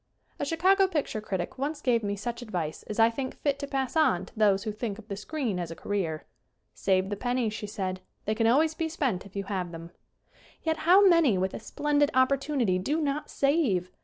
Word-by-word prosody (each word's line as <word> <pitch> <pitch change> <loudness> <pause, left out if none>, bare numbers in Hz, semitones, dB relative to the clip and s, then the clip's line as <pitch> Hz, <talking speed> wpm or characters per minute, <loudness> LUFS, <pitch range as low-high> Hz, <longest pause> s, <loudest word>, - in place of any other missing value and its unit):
A - - -1
Chicago 375 +6 +3
picture 295 - -2
critic 195 +3 -4
once 290 +2 -2
gave 245 -5 +2
me 205 0 -1
such 235 +4 -5
advice 175 -9 -4
as 210 - -4
I 225 0 +5
think 260 +2 -4
fit 285 -1 -1
to 280 - -4
pass 270 0 -2
on 190 - +3
to - - -17
those 205 -3 +3
who 215 - -2
think 210 -1 -4
of 225 -1 -13
the 200 - -4
screen 225 -2 -3
as 170 -2 -3
a 165 - -6
career. 170 -7 -3 0.5
"Save 190 0 +1
the - - 0
pen 245 +4 -2
nies," 230 -4 0
she 215 -1 -5
said, 190 -3 -4 0.2
"they 215 - +1
can 225 +1 +1
always 305 +7 +4
be 320 0 -2
spent 250 - -1
if 200 - -20
you 200 - -2
have 185 -3 -3
them." 165 0 -9 0.7
Yet 320 -1 0
how 390 +2 +8
many, 330 - +5
with 190 +1 -1
a - - -5
splendid 290 +5 +1
opportunity, 260 -6 +2
do 290 - 0
not 295 0 -2
save 265 - +1
230 Hz, 220 wpm, -28 LUFS, 195-290 Hz, 0.7 s, how